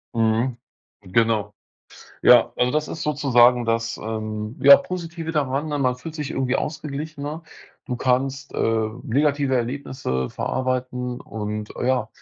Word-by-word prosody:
Mhm. 115 +2 +1 0.4
Genau. 110 +2 +1 0.7
Ja, - - +6
also 125 0 +1
das 155 0 0
ist - - -5
sozusagen 125 -5 +4
das, 115 0 -1
ähm, 110 0 -5
ja, 140 0 +10
Positive 170 -2 -5
daran, 145 -1 -1
ne, 145 -1 -2
man 130 -2 +2
fühlt 150 +6 -9
sich 150 -3 -4
irgendwie 130 -1 0
ausgeglichener, 150 +1 -5 0.4
du 125 - -2
kannst, 135 +2 0
äh, 110 -1 +1 0.2
negative 140 +1 +1
Erlebnisse 125 - -2
verarbeiten 125 -1 -2
und, 105 -1 -5
äh, - - -2
ja, 130 -1 +1
130 Hz, 135 wpm, -23 LUFS, 115-145 Hz, 0.7 s, ja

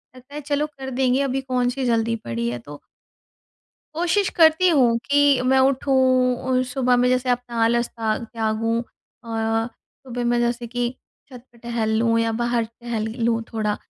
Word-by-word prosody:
लगता 255 +2 -16
है, 300 - -5
चलो 290 +1 -1
कर 270 -3 -9
देंगे, 260 +1 +1
अभी 270 -1 -1
कौन 250 -2 0
सी 255 +1 -3
जल्दी 230 -1 +1
पड़ी 115 0 -2
है, 120 - -4
तो 145 +4 -12 1.1
कोशिश 355 +4 +1
करती 325 +2 +5
हूँ 255 -8 +4
कि 285 -1 +4
मैं 265 +1 +3
उठूँ 270 +1 +2 0.6
और 255 0 +2
सुबह 250 0 +1
में 245 0 +3
जैसे 255 0 0
अपना 245 -1 -2
आलस 235 +1 +1
ता 220 -2 -2
त्यागूँ 225 0 -2
अ, 235 0 -18 0.8
सुबह 245 -1 -4
में 240 0 +1
जैसे 240 0 -1
कि 245 +1 -2 0.4
छत 250 -2 -11
पर 235 - -21
टहल 235 -2 -2
लूँ 230 0 +2
या 230 0 +1
बाहर 240 -1 0
टहल 230 -1 -5 0.2
लूँ 230 -1 +1
थोड़ा, 215 -2 -1
245 Hz, 175 wpm, -22 LUFS, 230-265 Hz, 1.1 s, करती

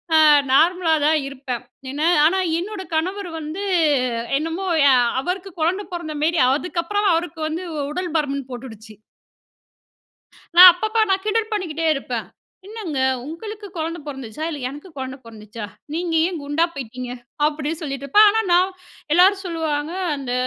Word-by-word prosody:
ஆ - - +7 0.3
நார்மலா 335 +3 +4
தான் 310 +1 +4
இருப்பேன். 260 -3 -5 0.3
என்ன 300 +4 0 0.2
ஆனா 380 +4 +3 0.2
என்னோட 400 +2 -5
கணவர் 370 +3 -2
வந்து 315 +6 -5 0.7
என்னமோ 330 +5 -3 0.2
எ - - +6 0.3
அவருக்கு 370 +4 -4
குழந்தை 370 +6 0
பொறந்த 320 -3 -5
மேரி, 335 +1 +2 0.2
அதுக்கப்புறம் 365 +5 -1
அவருக்கு 330 -1 -2
வந்து 340 +4 -4 0.2
உடல் 350 +1 -4
பருமன் 280 -3 -2
போட்டுடுச்சு. 225 -3 -9 1.6
நான் 360 +1 +12
அப்பப்ப 435 +4 +1
நான் 385 0 +1
கிண்டல் 440 +1 0
பண்ணிக்கிட்டே 330 -6 -2
இருப்பேன். 245 -4 -4 0.4
"என்னங்க 400 -11 -5 0.3
உங்களுக்கு 415 +7 -7
கொழந்த 330 +2 -3
பொறந்துச்சா? 270 0 -7
இல்ல, 295 -3 -5
எனக்கு 295 +7 -10
கொழந்த 260 0 -5
பொறந்துச்சா? 215 -1 -9 0.3
நீங்க 340 0 -2
ஏன் 350 -4 -4
குண்டா 290 +4 +1
போயிட்டீங்க?" 250 -1 -6 0.4
அப்படி 300 0 -3
சொல்லிட்டுருப்பேன். 280 +8 +3
ஆனா 445 +1 +1
நான் 365 +2 +4 0.4
எல்லாரும் 385 +3 +5
சொல்லுவாங்க, 320 -2 -2 0.2
"அந்த 255 -3 -4
325 Hz, 135 wpm, -21 LUFS, 280-370 Hz, 1.6 s, நான்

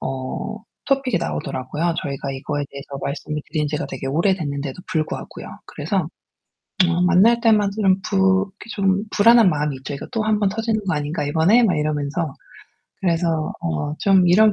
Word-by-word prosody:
어 135 +11 -4 0.3
토픽이 270 -2 +1
나오더라고요. 130 - -2
저희가 140 -1 -4
이거에 145 +2 -3
대해서 140 0 -8
말씀을 150 +1 -4
드린 150 -2 -1
지가 150 0 -2
되게 135 0 -5
오래됐는데도 150 -2 -1
불구하고요. 155 -1 -3 0.2
그래서 165 +2 -2 0.8
어 175 +1 +1
만날 205 +6 +5
때마다 215 -4 +3
이런 195 -2 +3
부 190 0 +2
이렇게 210 +3 -14
좀 195 0 +1
불안한 230 0 +6
마음이 150 -3 -1
있죠. 135 +2 -7
이거 140 - -6
또 225 -3 -1
'한번 210 -2 +2
터지는 220 +1 -1
것 180 - +1
아닌가, 150 +1 -2
이번에?' 165 +11 +4
막 185 -8 +2
이러면서. 150 +1 -1 0.7
그래서 165 -3 0
어 80 - -2
좀 190 -2 +4
이런 210 +4 +6
170 Hz, 370 characters per minute, -21 LUFS, 145-200 Hz, 0.8 s, 불안한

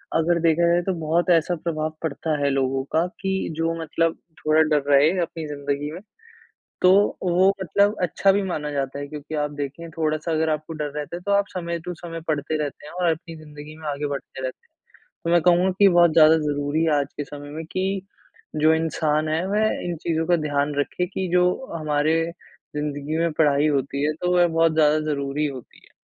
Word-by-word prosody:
अगर 170 +1 +2
देखा 170 +1 +3
जाए 175 0 +3
तो 190 - -1
बहुत 165 +3 0
ऐसा 175 +2 0
प्रभाव 155 -1 -3
पड़ता 155 0 -2
है, 140 - +2
लोगों 135 0 0
का, 165 +2 +3 0.2
कि 190 0 -1
जो 165 0 0
मतलब 165 +1 0 0.3
थोड़ा 155 +1 +4
डर 155 -2 +2
रहे 140 +3 +6
अपनी 165 -2 -4
ज़िंदगी 145 0 -3
में। 170 - -7 0.8
तो 180 - +6 0.3
वो 185 +2 +4
मतलब 200 +4 +2
अच्छा 195 +3 +3
भी 200 +1 +1
माना 150 -5 -3
जाता 140 0 -3
है, 145 - -5
क्योंकि 150 +1 -7
आप 150 0 -1
देखिए 155 +4 -6
थोड़ा-सा 155 +1 -1
अगर 160 0 +1
आपको 155 +1 -3
डर 150 -1 -3
रहता 150 +3 -4
है, - - -10
तो 200 - -2
आप 200 0 +3
समय 170 -1 -3
टू 180 - -4
समय 165 -1 -6
पढ़ते 155 0 -1
रहते 145 0 -7
हैं - - -11
और 180 -1 +1
अपनी 165 +1 -6
ज़िंदगी 150 0 -11
में 155 -1 -8
आगे 145 +1 -2
बढ़ते 140 -1 -6
रहते 130 - -6
हैं। - - -54 0.5
तो 170 - 0
मैं 175 -2 +4
कहूँगा 180 +2 +4
कि 200 -1 +7
बहुत 175 -2 +5
ज़्यादा 160 0 +7
ज़रूरी 145 +1 -1
है 160 - +2
आज 140 - -4
के 145 - -3
समय 145 0 -9
में, 160 +2 -6
कि 190 +2 -2 0.5
जो 155 +1 +4
इंसान 155 -1 0
है 160 +3 0
वह 215 +2 +2 0.2
इन 175 -1 -3
चीज़ों 165 -1 0
का 175 -1 +4
ध्यान 145 0 0
रखे 180 +5 -1
कि 190 0 -3
जो 180 0 +4 0.3
हमारे 155 -1 0 0.6
ज़िंदगी 150 +1 -3
में 170 -1 +1
पढ़ाई 145 -1 +4
होती 140 0 -1
है, 155 - +1
तो 180 +3 -2
वह 175 0 +5
बहुत 165 0 +2
ज़्यादा 155 -1 +4
ज़रूरी 140 +1 -1
होती 130 -4 -9
है। - - -24
155 Hz, 205 wpm, -23 LUFS, 150-170 Hz, 0.8 s, कि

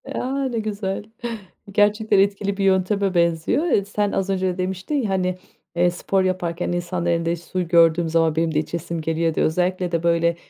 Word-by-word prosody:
A. 270 +2 -2
Ne 230 -2 -2
güzel 200 -3 -3 0.7
gerçekten 210 0 +3
etkili 200 0 +1
bir 195 - -1
yönteme 195 +1 +2
benziyor, 170 - +1
eee, 200 - +2
sen 205 0 -1
az 195 0 -1
önce 185 -1 0
demiştin, 185 +9 -3
ya, 240 -8 0
hani, 185 -1 0 0.4
eee, 175 +1 +3
spor 190 +2 0
yaparken 180 -2 -2
insanların 175 -1 -1
elinde 170 0 -1
su 175 +1 -4
gördüğüm 165 -1 +4
zaman 165 -1 +2
benim 165 0 0
de 150 - +2
içesim 165 +1 -4
geliyor 165 0 0
de - - +1
özellikle 180 +2 0
de 170 -1 -1
böyle 170 0 +2
180 Hz, 175 wpm, -22 LUFS, 170-195 Hz, 0.7 s, gördüğüm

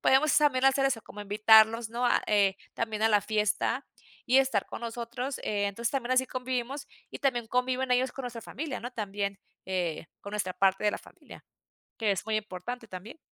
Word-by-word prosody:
podemos 275 +4 +4
también 275 -4 +3
hacer 270 0 +4
eso 250 -4 0
como 210 - -10
invitarlos, 220 +2 +5
¿no? 235 +2 -2
A, 240 - +3
eh, 200 -2 +3 0.2
también 220 -2 -2
a 225 - +5
la 210 -1 +4
fiesta 210 0 0 0.4
y 255 +2 +5
estar 265 -7 +2
con - - -7
nosotros, 240 +3 -4
eh, 205 -1 0
entonces 225 +3 -2
también 255 -3 -2
así 260 0 +3
convivimos 255 +2 -3 0.2
y - - -7
también 245 -5 +1
conviven 255 +2 0
ellos 250 +1 +2
con 270 - -6
nuestra 235 -2 -6
familia, 285 +4 -5
¿no? 245 - -5
También, 200 -3 -3 0.3
eh, 175 -4 -2
con 200 - -9
nuestra 190 -3 -1
parte 190 +1 +2
de 210 - +4
la - - -4
familia, - - -15 0.5
que 220 -3 +1
es 195 - -1
muy 220 -1 +1
importante 215 +4 -5
también. 190 - -9
230 Hz, 195 wpm, -29 LUFS, 205-255 Hz, 0.5 s, invitarlos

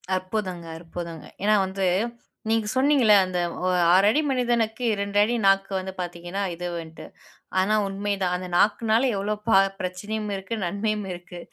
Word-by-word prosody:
அற்புதங்க, 185 -2 -3
அற்புதங்க! 165 -1 -7 0.2
ஏன்னா 215 +1 +4
வந்து 190 0 -2 0.6
நீங்க 225 -1 +1
சொன்னீங்கல்ல, 260 -5 +5
அந்த 185 -1 -2 0.3
ஒ - - +2 0.2
6 190 +2 +5
அடி 295 +7 +3
மனிதனுக்கு 240 -2 0
2 200 0 -2
அடி 225 +3 0
நாக்கு 195 0 +3
வந்து 190 0 -6
பாத்தீங்கன்னா 175 +2 -5
இதுவுன்ட்டு. 170 -2 -6 0.5
ஆனா, 205 +3 +2
உண்மைதான். 195 -2 -1
அந்த 180 0 -5
நாக்குனால 225 +5 +3
எவ்ளோ 205 +2 -1
பா 190 - +6 0.2
பிரச்சனையும் 205 +4 -4
இருக்கு, 195 +3 -4
நன்மையும் 210 +3 -2
இருக்கு. 175 0 -10
195 Hz, 140 wpm, -25 LUFS, 180-215 Hz, 0.6 s, பா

